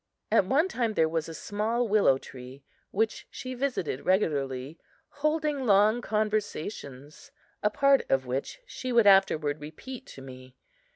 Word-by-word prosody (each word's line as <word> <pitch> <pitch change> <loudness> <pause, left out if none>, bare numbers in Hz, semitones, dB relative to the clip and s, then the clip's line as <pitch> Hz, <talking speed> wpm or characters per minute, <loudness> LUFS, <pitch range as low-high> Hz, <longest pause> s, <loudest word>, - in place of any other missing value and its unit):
At 220 -3 +4
one 290 - +3
time 235 - -2
there 160 - +3
was 160 0 -2
a - - -7
small 220 +7 -1
willow 200 -10 +4
tree 130 +1 -12 0.3
which 220 +3 -1
she 255 0 -7
visited 245 - -2
regularly, 145 -6 -1 0.3
holding 300 -2 -1
long 210 +3 +4
conversations, 205 - -3 0.3
a 210 - +2
part 275 +5 +3
of 135 -1 +2
which 135 - -4
she 255 - -6
would 235 -2 +4
afterward 160 -7 +4
repeat 250 - -9
to 135 - -11
me. 130 -1 -12
205 Hz, 140 wpm, -28 LUFS, 145-245 Hz, 0.3 s, At